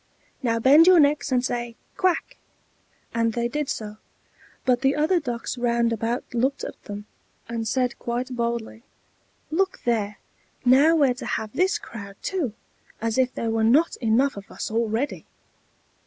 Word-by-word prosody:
Now 230 Hz, -3 st, +1 dB
bend 285 Hz, +8 st, +6 dB
your 365 Hz, -2 st, +8 dB
necks 295 Hz, -1 st, +3 dB
and 250 Hz, -1 st, +2 dB
say 240 Hz, -2 st, -3 dB, 0.2 s
'Quack!'" 365 Hz, -3 st, 0 dB, 0.8 s
And 230 Hz, -1 st, +1 dB
they 235 Hz, +1 st, 0 dB
did 295 Hz, +3 st, -3 dB
so; 210 Hz, -1 st, -4 dB, 0.7 s
but 250 Hz, -1 st, +2 dB
the 270 Hz, +1 st, +3 dB
other 315 Hz, +5 st, +2 dB
ducks 240 Hz, -3 st, -4 dB
round 235 Hz, -1 st, +1 dB
about 230 Hz, +3 st, -2 dB
looked 260 Hz, +4 st, 0 dB
at -, -, -7 dB
them, 205 Hz, 0 st, -7 dB, 0.4 s
and 230 Hz, -1 st, -3 dB
said 250 Hz, 0 st, 0 dB
quite 240 Hz, +2 st, -3 dB
boldly, 235 Hz, -1 st, -3 dB, 0.7 s
"Look 380 Hz, +4 st, 0 dB
there! 210 Hz, -4 st, 0 dB, 0.5 s
now 280 Hz, +6 st, +6 dB
we're 280 Hz, -5 st, +4 dB
to 255 Hz, -, -7 dB
have 220 Hz, -1 st, -3 dB
this 370 Hz, +7 st, +2 dB
crowd 200 Hz, -3 st, -9 dB
too! 335 Hz, -, -2 dB, 0.5 s
as 225 Hz, +2 st, -1 dB
if 255 Hz, 0 st, +1 dB
there 230 Hz, -, -1 dB
were 225 Hz, 0 st, +1 dB
not 280 Hz, +9 st, +4 dB
enough 240 Hz, +2 st, +2 dB
of 200 Hz, -, -9 dB
us -, -, -5 dB
already! 230 Hz, +4 st, -1 dB
240 Hz, 155 wpm, -24 LUFS, 230-280 Hz, 0.8 s, your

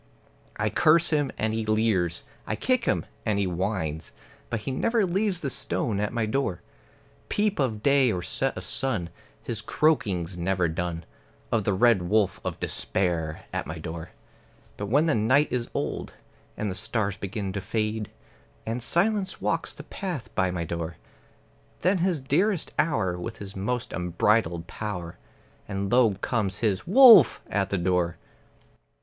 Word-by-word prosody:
I 105 Hz, 0 st, 0 dB
curse 165 Hz, +8 st, +4 dB
him, 145 Hz, -3 st, +2 dB
and 110 Hz, 0 st, 0 dB
he 110 Hz, 0 st, -1 dB
leers; 110 Hz, -6 st, +1 dB, 0.2 s
I 105 Hz, -, -1 dB
kick 255 Hz, -, +1 dB
him, -, -, +1 dB, 0.2 s
and 105 Hz, -3 st, 0 dB
he 100 Hz, -, +1 dB
whines; 90 Hz, -4 st, -3 dB, 0.4 s
But 115 Hz, -, -2 dB
he 135 Hz, -, -4 dB
never 225 Hz, -, +1 dB
leaves 190 Hz, 0 st, 0 dB
the 140 Hz, -, -2 dB
stone 125 Hz, -6 st, -1 dB
at 105 Hz, 0 st, -1 dB
my 115 Hz, -2 st, 0 dB
door. 110 Hz, -6 st, -1 dB, 0.7 s
Peep 210 Hz, -3 st, 0 dB
of 110 Hz, -6 st, -1 dB
day 140 Hz, -3 st, +4 dB
or 90 Hz, -4 st, -3 dB
set 135 Hz, +8 st, -1 dB
of -, -, -6 dB
sun, 115 Hz, -11 st, -1 dB, 0.3 s
his 110 Hz, -2 st, -2 dB
croaking's 100 Hz, -, 0 dB
never 90 Hz, 0 st, +1 dB
done 85 Hz, +1 st, -3 dB, 0.5 s
Of 110 Hz, -4 st, +1 dB
the 100 Hz, -, +2 dB
Red 115 Hz, 0 st, +4 dB
Wolf 105 Hz, -3 st, +2 dB
of -, -, -4 dB
Despair 85 Hz, -4 st, -1 dB
at -, -, -2 dB
my 80 Hz, -, -5 dB
door. 80 Hz, +1 st, -6 dB, 0.7 s
But 100 Hz, -, -5 dB
when 145 Hz, +9 st, +3 dB
the 160 Hz, -, +2 dB
night 130 Hz, +7 st, +3 dB
is 120 Hz, -2 st, -2 dB
old, -, -, -3 dB, 0.4 s
and 105 Hz, -2 st, -2 dB
the -, -, -3 dB
stars 100 Hz, +2 st, -1 dB
begin 100 Hz, -1 st, -4 dB
to 100 Hz, -, -3 dB
fade, 110 Hz, 0 st, -2 dB, 0.6 s
And 115 Hz, +2 st, -3 dB
silence 190 Hz, -, +1 dB
walks -, -, -1 dB
the -, -, -9 dB
path 175 Hz, -, -6 dB
by 95 Hz, -, +1 dB
my 90 Hz, -2 st, -2 dB
door, 85 Hz, 0 st, -4 dB, 0.9 s
Then 185 Hz, +1 st, +2 dB
is 170 Hz, -, +2 dB
his 180 Hz, -5 st, +1 dB
dearest 175 Hz, +7 st, +1 dB
hour, 95 Hz, -, +1 dB, 0.2 s
his 100 Hz, -1 st, -9 dB
most 120 Hz, +5 st, -2 dB
unbridled 90 Hz, 0 st, +1 dB
power, 90 Hz, -, -6 dB, 0.5 s
And 100 Hz, -1 st, -3 dB
low 120 Hz, -5 st, +4 dB
comes 100 Hz, -2 st, -1 dB
his 105 Hz, -5 st, -1 dB
"Wolf!" 220 Hz, -, +8 dB
at 100 Hz, -2 st, 0 dB
the 100 Hz, -, 0 dB
door. 90 Hz, -1 st, 0 dB
105 Hz, 160 wpm, -26 LUFS, 90-135 Hz, 0.9 s, Wolf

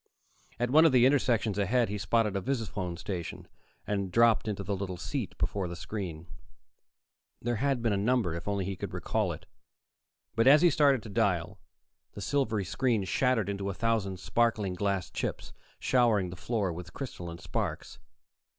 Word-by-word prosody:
At 120 Hz, +1 st, 0 dB
one 155 Hz, +3 st, +7 dB
of 165 Hz, -, +6 dB
the 125 Hz, -1 st, +5 dB
intersections 120 Hz, -6 st, +2 dB
ahead, 115 Hz, +4 st, +2 dB
he 105 Hz, 0 st, -3 dB
spotted 105 Hz, 0 st, +1 dB
a 100 Hz, -, 0 dB
visiphone 100 Hz, -7 st, -3 dB
station, 90 Hz, -2 st, -5 dB, 0.4 s
and 100 Hz, -3 st, -2 dB
dropped 115 Hz, +1 st, +4 dB
onto 100 Hz, -1 st, -3 dB
the 100 Hz, +1 st, -2 dB
little 95 Hz, -2 st, -4 dB
seat -, -, -4 dB
before 100 Hz, -3 st, -1 dB
the 85 Hz, -, -6 dB
screen. 90 Hz, -3 st, -5 dB, 1.1 s
There 120 Hz, -1 st, -1 dB
had 135 Hz, -1 st, 0 dB
been 115 Hz, -3 st, +2 dB
a -, -, +1 dB
number, 110 Hz, -4 st, +1 dB
if 85 Hz, +2 st, -6 dB
only 100 Hz, -2 st, -1 dB
he 95 Hz, +1 st, -3 dB
could -, -, -6 dB
recall -, -, -1 dB
it. -, -, -8 dB, 0.9 s
But 115 Hz, +2 st, +3 dB
as 145 Hz, +4 st, +7 dB
he 175 Hz, -, +6 dB
started 140 Hz, -5 st, +3 dB
to 110 Hz, -, -8 dB
dial, 95 Hz, -6 st, 0 dB, 0.5 s
the 100 Hz, -, -8 dB
silvery 110 Hz, -5 st, 0 dB
screen 115 Hz, +1 st, +1 dB
shattered 115 Hz, +2 st, +1 dB
into 100 Hz, -1 st, -3 dB
a 100 Hz, -, -4 dB
thousand 110 Hz, -5 st, 0 dB
sparkling 110 Hz, -5 st, +1 dB
glass 95 Hz, -1 st, -1 dB
chips, -, -, -4 dB, 0.2 s
showering 110 Hz, -8 st, +2 dB
the -, -, -7 dB
floor 100 Hz, -2 st, -1 dB
with 85 Hz, -2 st, -9 dB
crystal 105 Hz, -10 st, -6 dB
and 85 Hz, 0 st, -8 dB
sparks. 90 Hz, -1 st, -4 dB
105 Hz, 175 wpm, -29 LUFS, 95-120 Hz, 1.1 s, one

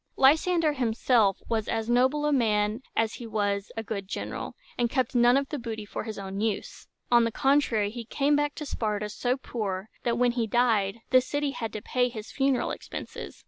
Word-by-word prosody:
Lysander 315 Hz, +3 st, +4 dB
himself 230 Hz, -5 st, +2 dB
was 220 Hz, -2 st, -1 dB
as 225 Hz, -1 st, -1 dB
noble 260 Hz, +5 st, +3 dB
a 300 Hz, -, +2 dB
man 215 Hz, -2 st, +1 dB
as 225 Hz, 0 st, +1 dB
he 240 Hz, -, -7 dB
was 205 Hz, -2 st, -1 dB
a 225 Hz, -, -2 dB
good 200 Hz, -3 st, -4 dB
general, -, -, -5 dB, 0.2 s
and 240 Hz, -1 st, +1 dB
kept 260 Hz, +1 st, 0 dB
none 245 Hz, +1 st, +5 dB
of 275 Hz, 0 st, -1 dB
the 295 Hz, -, -3 dB
booty 225 Hz, -3 st, -5 dB
for -, -, -5 dB
his 220 Hz, -2 st, -5 dB
own 195 Hz, 0 st, -5 dB
use. 220 Hz, -2 st, -3 dB, 0.2 s
On 240 Hz, -1 st, +6 dB
the 230 Hz, -, 0 dB
contrary, 245 Hz, -6 st, +2 dB
he 235 Hz, +1 st, -6 dB
came 280 Hz, +6 st, +1 dB
back 290 Hz, 0 st, 0 dB
to 300 Hz, -, -5 dB
Sparta 210 Hz, -5 st, -2 dB
so 245 Hz, +4 st, -1 dB
poor, 205 Hz, -6 st, -4 dB
that, 235 Hz, -1 st, 0 dB
when 245 Hz, 0 st, +3 dB
he 235 Hz, -2 st, -1 dB
died, 225 Hz, -2 st, +2 dB
the 255 Hz, 0 st, +7 dB
city 290 Hz, +2 st, -1 dB
had 225 Hz, -5 st, -4 dB
to 215 Hz, -, -5 dB
pay 250 Hz, -1 st, +1 dB
his 220 Hz, -3 st, -8 dB
funeral 270 Hz, -2 st, +1 dB
expenses. -, -, -7 dB
235 Hz, 200 wpm, -27 LUFS, 215-260 Hz, 0.2 s, the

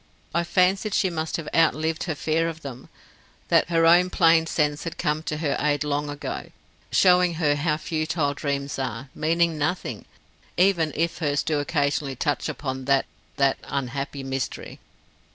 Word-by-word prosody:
"I 170 Hz, +1 st, +1 dB
fancied 190 Hz, +4 st, +2 dB
she 190 Hz, -, +2 dB
must 160 Hz, -1 st, -2 dB
have 160 Hz, -3 st, -6 dB
outlived 160 Hz, -1 st, +2 dB
her 160 Hz, -4 st, -2 dB
fear 160 Hz, +3 st, 0 dB
of 165 Hz, 0 st, -9 dB
them; 130 Hz, -3 st, -8 dB, 0.6 s
that -, -, +3 dB
her 165 Hz, -1 st, +3 dB
own 175 Hz, +2 st, +6 dB
plain 165 Hz, -2 st, +4 dB
sense 150 Hz, -2 st, 0 dB
had 170 Hz, -, -6 dB
come 150 Hz, +1 st, 0 dB
to 150 Hz, -1 st, -3 dB
her 150 Hz, -2 st, 0 dB
aid 145 Hz, -1 st, +1 dB
long 145 Hz, 0 st, -1 dB
ago, 145 Hz, 0 st, -5 dB, 0.4 s
showing 180 Hz, -2 st, +4 dB
her 155 Hz, -3 st, +2 dB
how 150 Hz, +1 st, 0 dB
futile 155 Hz, -2 st, -1 dB
dreams 140 Hz, -1 st, -3 dB
are, 125 Hz, 0 st, -4 dB
meaning 165 Hz, +1 st, +1 dB
nothing, 175 Hz, +5 st, -2 dB, 0.5 s
even 175 Hz, -4 st, +3 dB
if 165 Hz, +2 st, -1 dB
hers 145 Hz, -3 st, 0 dB
do 155 Hz, -2 st, 0 dB
occasionally 145 Hz, -2 st, -1 dB
touch 145 Hz, +4 st, -1 dB
upon 130 Hz, -2 st, -4 dB
that 135 Hz, 0 st, +3 dB, 0.3 s
that 135 Hz, -1 st, +2 dB
unhappy 140 Hz, +1 st, -4 dB
mystery." 135 Hz, -1 st, -4 dB
155 Hz, 160 wpm, -24 LUFS, 140-165 Hz, 0.6 s, own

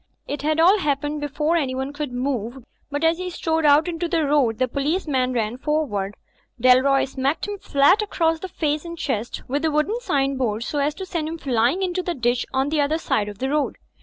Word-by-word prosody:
It 290 Hz, -1 st, -4 dB
had 310 Hz, +2 st, 0 dB
all 370 Hz, +6 st, +6 dB
happened 295 Hz, -1 st, -1 dB
before 300 Hz, +3 st, 0 dB
anyone 265 Hz, -3 st, -1 dB
could 290 Hz, -2 st, -4 dB
move, 245 Hz, -1 st, -3 dB, 0.3 s
but 290 Hz, +1 st, -3 dB
as 325 Hz, +1 st, +3 dB
he 365 Hz, 0 st, -3 dB
strode 320 Hz, -2 st, -1 dB
out 295 Hz, +3 st, +5 dB
into 345 Hz, 0 st, -2 dB
the 330 Hz, -2 st, +1 dB
road 275 Hz, -6 st, +2 dB
the 255 Hz, -, +1 dB
policeman 280 Hz, -2 st, 0 dB
ran 235 Hz, 0 st, -2 dB
for 305 Hz, +2 st, 0 dB
ward. 200 Hz, -4 st, -3 dB, 0.4 s
Dalroy 255 Hz, +3 st, +5 dB
smote 270 Hz, +7 st, -1 dB
him 410 Hz, -1 st, -5 dB
flat 285 Hz, +9 st, +4 dB
across 330 Hz, -6 st, 0 dB
face 310 Hz, -4 st, -2 dB
and 335 Hz, 0 st, -7 dB
chest 240 Hz, -7 st, -3 dB
with 285 Hz, +3 st, -1 dB
the 320 Hz, -, +1 dB
wooden 305 Hz, +10 st, 0 dB
sign 275 Hz, -, 0 dB
board, 230 Hz, -3 st, -1 dB
so 290 Hz, -, -2 dB
as 290 Hz, +1 st, 0 dB
to 380 Hz, -, -6 dB
send 335 Hz, -4 st, -3 dB
him 330 Hz, +1 st, -4 dB
flying 265 Hz, +5 st, +1 dB
into 365 Hz, 0 st, -1 dB
the 350 Hz, -1 st, -3 dB
ditch 240 Hz, -1 st, 0 dB
on 265 Hz, +2 st, 0 dB
the 300 Hz, -1 st, +1 dB
other 295 Hz, +2 st, +1 dB
side 210 Hz, -9 st, -1 dB
of 205 Hz, -, -9 dB
the 265 Hz, +5 st, -2 dB
road. 300 Hz, -1 st, 0 dB
290 Hz, 215 wpm, -23 LUFS, 260-325 Hz, 0.4 s, all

